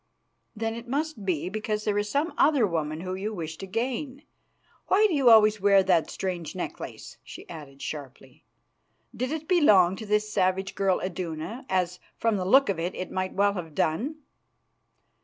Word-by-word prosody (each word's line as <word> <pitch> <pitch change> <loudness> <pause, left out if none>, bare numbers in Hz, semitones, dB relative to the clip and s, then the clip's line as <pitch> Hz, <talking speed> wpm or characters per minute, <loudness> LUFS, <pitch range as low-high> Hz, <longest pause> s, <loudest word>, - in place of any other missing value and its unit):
"Then 225 +1 -2
it 235 +1 -8
must 280 -4 -3
be 175 -4 -1
because 215 +1 -3
there 205 -1 +1
is 205 0 -2
some 290 +7 0
other 285 -5 +4
woman 160 -3 -2
whom 185 +1 -4
you 215 +2 -3
wish 160 -3 -5
to 195 - -7
gain. 255 +6 -3 0.6
Why 415 +3 +4
do 405 - +2
you 275 -5 +4
always 215 -2 +6
wear 200 -1 +5
that 175 -4 +2
strange 180 -4 -4
necklace?" - - -7
she - - -11
added 140 -4 -10
sharply. 135 -3 -8 0.7
"Did 255 +2 -2
it 315 0 -4
belong 205 - +5
to 220 - -8
this 210 +1 0
savage 190 0 +1
girl 195 -2 +1
Iduna, 185 - -5
as, 180 -1 0 0.2
from 225 -2 +1
the 185 - -2
look 270 +8 +5
of 195 -4 -1
it, 175 +3 -3
it 185 - -5
might 185 0 -2
well 200 +1 +2
have 165 -6 -7
done?" 230 - 0
200 Hz, 175 wpm, -27 LUFS, 180-230 Hz, 0.7 s, always